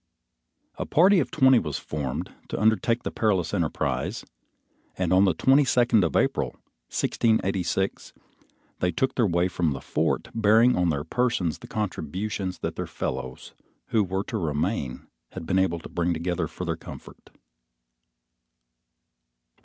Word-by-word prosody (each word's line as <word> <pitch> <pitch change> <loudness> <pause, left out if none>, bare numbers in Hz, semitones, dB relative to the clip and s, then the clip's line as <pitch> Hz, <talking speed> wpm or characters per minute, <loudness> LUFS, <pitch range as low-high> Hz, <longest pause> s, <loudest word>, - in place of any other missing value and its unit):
A - - -2
party 185 +4 +5
of 145 - -1
twenty 130 -2 +5
was 75 -7 -3
formed 70 -4 -4
to - - -4
undertake 110 +2 +2
the - - -3
perilous 95 -7 0
enterprise, 85 -6 -1 0.7
and 90 -1 +1
on 95 +2 +6
the 95 -4 +2
twenty 135 - +4
second 120 -5 +3
of 85 - -1
April, - - +1 0.4
1686, 95 -4 0 0.7
they 90 - +1
took 130 +10 0
their 120 -4 +2
way 85 0 +2
from 85 -4 0
the 65 - -6
fort, - - -1
bearing 115 +3 +4
on 90 -1 +2
their 75 -2 -1
persons 95 -5 0
the - - -11
contributions 95 -1 -3
that - - -3
their - - -3
fellows 65 0 -5 0.4
who 110 -2 +3
were 95 +1 -2
to 110 0 -4
remain 75 - -2 0.3
had - - -7
been 95 - +1
able 95 -3 +1
to 80 - -9
bring 85 0 -1
together 85 +2 -2
for - - -7
their - - -1
comfort. - - -12
95 Hz, 145 wpm, -26 LUFS, 85-115 Hz, 0.7 s, on